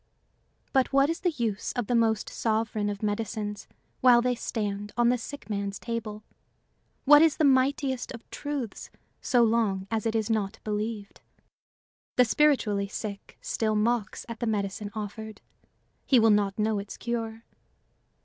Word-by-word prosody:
But 265 Hz, -1 st, +3 dB
what 275 Hz, +2 st, +4 dB
is 330 Hz, -, -4 dB
the 360 Hz, -, +1 dB
use 230 Hz, -, -2 dB
of 245 Hz, -, -2 dB
the 245 Hz, -, -1 dB
most 225 Hz, -2 st, +2 dB
sovereign 220 Hz, -2 st, -1 dB
of 205 Hz, +1 st, -5 dB
medicines 210 Hz, 0 st, -3 dB, 0.3 s
while 250 Hz, -2 st, +6 dB
they 250 Hz, +1 st, +1 dB
stand 205 Hz, -3 st, -3 dB
on 240 Hz, 0 st, +4 dB
the 250 Hz, -, +3 dB
sick 285 Hz, +5 st, -8 dB
man's 200 Hz, -2 st, -3 dB
table? 220 Hz, -2 st, -5 dB, 0.8 s
What 295 Hz, +1 st, +8 dB
is 320 Hz, -2 st, +4 dB
the -, -, +1 dB
mightiest 265 Hz, -1 st, +2 dB
of 235 Hz, -2 st, -10 dB
truths 285 Hz, -7 st, -5 dB, 0.3 s
so 245 Hz, -2 st, +3 dB
long 220 Hz, -4 st, +1 dB
as 225 Hz, 0 st, 0 dB
it 225 Hz, -, -1 dB
is 220 Hz, -2 st, +1 dB
not 215 Hz, -2 st, -1 dB
believed? 210 Hz, -1 st, -4 dB, 0.9 s
The 250 Hz, -, +6 dB
spiritually 225 Hz, -6 st, +2 dB
sick 200 Hz, 0 st, -7 dB
still 215 Hz, -1 st, -1 dB
mocks 220 Hz, -1 st, 0 dB
at 230 Hz, -1 st, -7 dB
the 235 Hz, -, -1 dB
medicine 205 Hz, -1 st, -2 dB
offered; 215 Hz, 0 st, -6 dB, 0.7 s
he 260 Hz, -, +6 dB
will 225 Hz, -1 st, +5 dB
not 205 Hz, -1 st, +2 dB
know 215 Hz, -1 st, +1 dB
its 200 Hz, 0 st, -8 dB
cure. 230 Hz, -1 st, -4 dB
225 Hz, 155 wpm, -27 LUFS, 210-245 Hz, 0.9 s, What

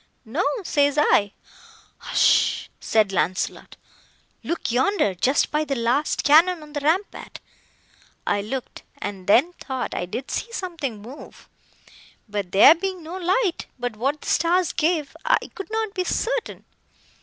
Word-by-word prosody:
No, 275 Hz, +12 st, -1 dB, 0.2 s
says 285 Hz, -3 st, +1 dB
I. 205 Hz, -8 st, +3 dB, 0.7 s
Hush! -, -, +2 dB
said 215 Hz, -3 st, +2 dB
Launcelot,—look 190 Hz, -, -4 dB
yonder—just 255 Hz, -, +1 dB
by 300 Hz, +1 st, +1 dB
the 280 Hz, -2 st, -2 dB
last 245 Hz, +5 st, 0 dB
cannon 325 Hz, +3 st, +5 dB
on 300 Hz, -1 st, -14 dB
the 290 Hz, -, -2 dB
rampart! 325 Hz, +8 st, -2 dB, 0.9 s
I 205 Hz, -, +1 dB
looked, 255 Hz, +5 st, -6 dB, 0.2 s
and 195 Hz, -2 st, -6 dB
then 275 Hz, -, +4 dB
thought 260 Hz, -1 st, -4 dB
I 175 Hz, -, -3 dB
did 255 Hz, +9 st, -6 dB
see 465 Hz, -, -3 dB
something 320 Hz, -, -5 dB
move; 260 Hz, +6 st, -12 dB, 0.8 s
but 205 Hz, -4 st, -4 dB
there 200 Hz, +10 st, +8 dB
being 370 Hz, 0 st, -4 dB
no 330 Hz, +3 st, -7 dB
light, 375 Hz, +1 st, 0 dB
but 245 Hz, -2 st, -4 dB
what 275 Hz, +7 st, -1 dB
the -, -, -10 dB
stars 345 Hz, +2 st, +2 dB
gave, 315 Hz, -2 st, 0 dB
I -, -, +4 dB, 0.2 s
could 390 Hz, -, -8 dB
not 440 Hz, -2 st, -2 dB
be 365 Hz, -, -1 dB
certain. 485 Hz, +6 st, -2 dB
295 Hz, 135 wpm, -23 LUFS, 230-360 Hz, 0.9 s, there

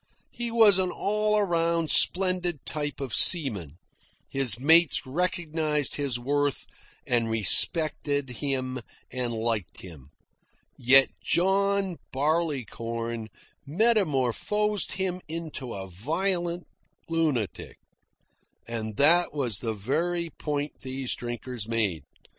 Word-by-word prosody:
He 240 Hz, -1 st, -3 dB
was 220 Hz, -4 st, +6 dB
an 185 Hz, -1 st, +1 dB
all 210 Hz, +2 st, 0 dB
round 170 Hz, -3 st, +1 dB
splendid 180 Hz, -4 st, +3 dB
type 145 Hz, -2 st, -4 dB
of 135 Hz, -4 st, -5 dB
seaman; 105 Hz, -, +2 dB, 0.5 s
his 130 Hz, -5 st, +1 dB
mates 160 Hz, +3 st, +4 dB
recognised 155 Hz, -1 st, -1 dB
his 140 Hz, -4 st, -1 dB
worth, 145 Hz, +3 st, -1 dB, 0.4 s
and 115 Hz, -2 st, 0 dB
respected 145 Hz, -, +2 dB
him 130 Hz, 0 st, -3 dB, 0.3 s
and 125 Hz, -2 st, -2 dB
liked 110 Hz, -4 st, -3 dB
him. 75 Hz, -7 st, -12 dB, 0.7 s
Yet 130 Hz, +2 st, +5 dB
John 195 Hz, 0 st, +1 dB
Barleycorn 120 Hz, -, -2 dB, 0.4 s
metamorphosed 205 Hz, -, +1 dB
him 185 Hz, -1 st, -3 dB
into 155 Hz, -6 st, -5 dB
a 95 Hz, -1 st, -6 dB
violent 170 Hz, -, -2 dB, 0.4 s
lunatic. 155 Hz, -, -2 dB, 0.9 s
And 110 Hz, -2 st, -5 dB
that 170 Hz, +4 st, +4 dB
was 120 Hz, -9 st, +1 dB
the 115 Hz, -2 st, -3 dB
very 165 Hz, -, -2 dB
point 145 Hz, 0 st, -4 dB
these 130 Hz, -1 st, -4 dB
drinkers 120 Hz, -2 st, -5 dB
made. 105 Hz, -10 st, -1 dB
145 Hz, 100 wpm, -26 LUFS, 120-175 Hz, 0.9 s, was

